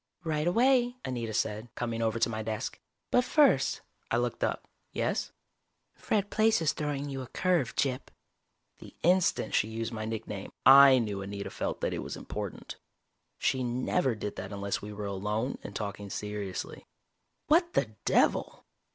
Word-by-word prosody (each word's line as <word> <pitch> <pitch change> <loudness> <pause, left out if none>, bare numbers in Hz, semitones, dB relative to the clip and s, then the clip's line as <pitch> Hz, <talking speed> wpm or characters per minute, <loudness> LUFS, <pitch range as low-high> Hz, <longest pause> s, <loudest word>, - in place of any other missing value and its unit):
"Right 155 -1 -1
away," 245 +5 +3
Anita 120 -3 -3
said, 110 +1 -2
coming 115 -1 -2
over 115 0 +1
to 115 - +3
my 110 -1 -3
desk. 110 -1 -4 0.3
"But 250 - +4
first 295 +3 +3
" - - -41
I - - +1
looked - - -1
up. - - -1 0.2
"Yes?" - - -1 0.6
"Fred 205 -1 -1
Plaice 220 0 +3
is 160 -2 +1
throwing 145 -1 -3
you 135 -1 -4
a 130 - -7
curve, 170 -2 0
Gyp." 130 -2 0 0.7
The - - -13
instant 180 +1 +2
she 105 - +3
used 115 +1 -4
my 110 -1 -4
nickname, 110 -3 -5
I 135 0 +9
knew 105 -5 -1
Anita 100 +1 -5
felt - - -3
that - - 0
it - - -3
was - - -5
important. - - -6 0.6
She 130 -1 0
never 125 +3 0
did 105 -1 -5
that 95 +1 -6
unless 100 0 -2
we 105 - -7
were 105 0 -5
alone 105 +6 -2
and 100 - -8
talking 100 -1 -4
seriously. 105 -2 -5 0.6
"What 340 +3 +3
the 110 - 0
devil!" - - +2
115 Hz, 165 wpm, -30 LUFS, 105-155 Hz, 0.7 s, I